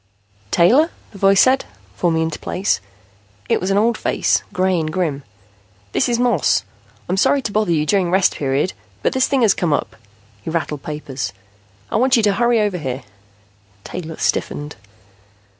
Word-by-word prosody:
"Taylor?" 245 - +4 0.2
the 200 - -12
face 195 0 +5
said, 260 +1 +3 0.3
forming 165 -2 +1
into 160 -1 -3
place. 190 +3 -1 0.7
It - - +1
was 185 - -1
an 195 - +2
old 230 +3 +2
face, - - +1
gray 185 -1 +1
and 155 -1 -2
grim. 155 -5 -1 0.7
"This - - +1
is 240 - +1
Moss. 235 - +2 0.4
I'm 185 - -1
sorry 275 +7 +3
to 210 - -3
bother 210 -3 +1
you 155 -2 +1
during 185 +1 +2
Rest 185 +1 +3
Period, 140 +5 0 0.3
but - - +1
this 260 0 +2
thing 270 -3 +1
has 210 -3 +5
come 170 -4 0
up." - - -2 0.5
He - - -6
rattled 160 -3 -2
papers. 150 - -5 0.6
"I - - +1
want 255 +2 +4
you 225 - +2
to 205 -1 +3
hurry 235 +2 +2
over 205 -4 0
here." 130 -3 -4 0.8
Taylor 165 -3 -7
stiffened. 145 +1 -2
185 Hz, 170 wpm, -19 LUFS, 155-220 Hz, 0.8 s, face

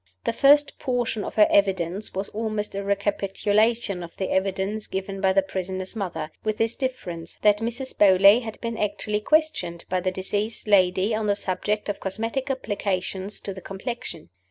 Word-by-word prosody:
The - - 0
first 290 +3 +5
portion 245 -5 -1
of - - -6
her 210 -1 +6
evidence 190 0 +1
was 195 +1 -2
almost 215 -1 -3
a 200 0 -3
recapitulation 200 +1 +1
of 170 -1 -9
the 190 - -2
evidence 195 +2 -1
given 195 0 -4
by 190 -1 +4
the 195 0 +3
prisoner's 190 +1 -4
mother 175 -7 -4
with 215 -1 -1
this 225 +1 +1
difference, 175 - -4
that 210 -1 +5
Mrs. 240 +4 -4
Beauly 200 +3 +7
had 220 -2 -7
been 230 -1 -3
actually 210 0 -1
questioned 305 - 0
by 185 - +1
the 185 +1 0
deceased 205 +4 -3
lady 190 +1 +3
on 215 0 -1
the 205 - +3
subject 205 +2 -2
of 205 - -3
cosmetic 225 +8 -3
applications 200 -5 -2
to 195 - -5
the 190 - -9
complexion. 195 - -6
205 Hz, 170 wpm, -25 LUFS, 190-220 Hz, -, Beauly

